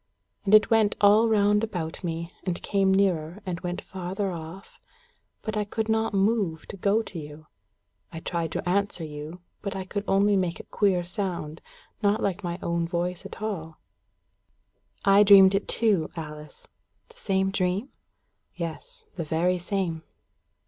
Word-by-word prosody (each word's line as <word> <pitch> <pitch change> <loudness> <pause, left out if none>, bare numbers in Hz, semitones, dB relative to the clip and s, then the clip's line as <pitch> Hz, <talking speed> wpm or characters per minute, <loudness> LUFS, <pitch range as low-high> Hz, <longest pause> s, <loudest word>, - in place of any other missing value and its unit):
And 205 +2 +6
it 215 +2 +5
went 220 -2 +4
all 210 +3 +6
round 210 0 +3
about 175 -7 -4
me, 170 0 -4
and 180 -2 -2
came 195 -1 +2
nearer, 185 -3 +1
and 180 -2 -3
went 180 -1 -4
farther 190 +1 -3
off, 170 +3 -9 0.6
but 220 -1 -3
I 210 - +1
could 220 +2 -3
not 220 0 +1
move 195 -5 +1
to - - -6
go 205 +4 +2
to 180 - -7
you. 150 +1 -10 0.7
I 165 - -6
tried 165 -1 -3
to - - -3
answer 195 -1 0
you, 155 +3 -7 0.2
but 200 -1 -4
I 190 - -3
could 205 +2 -3
only 200 +1 +3
make 180 -3 0
a - - -7
queer 190 -4 +1
sound, 175 -4 -4 0.4
not 205 0 +2
like 195 0 -2
my 175 -1 -3
own 170 0 0
voice 175 0 -3
at 215 - -10
all." 165 -7 -4 1.3
"I 200 +1 +7
dreamed 195 -2 +8
it 195 - 0
too, 210 -8 +2
Alice." 150 -2 -9 0.4
"The - - -20
same 190 0 0
dream?" 190 +6 -1 0.7
"Yes, 165 -3 -6
the 170 - -4
very 170 +4 +1
same." 175 -3 -2
190 Hz, 160 wpm, -26 LUFS, 170-205 Hz, 1.3 s, dreamed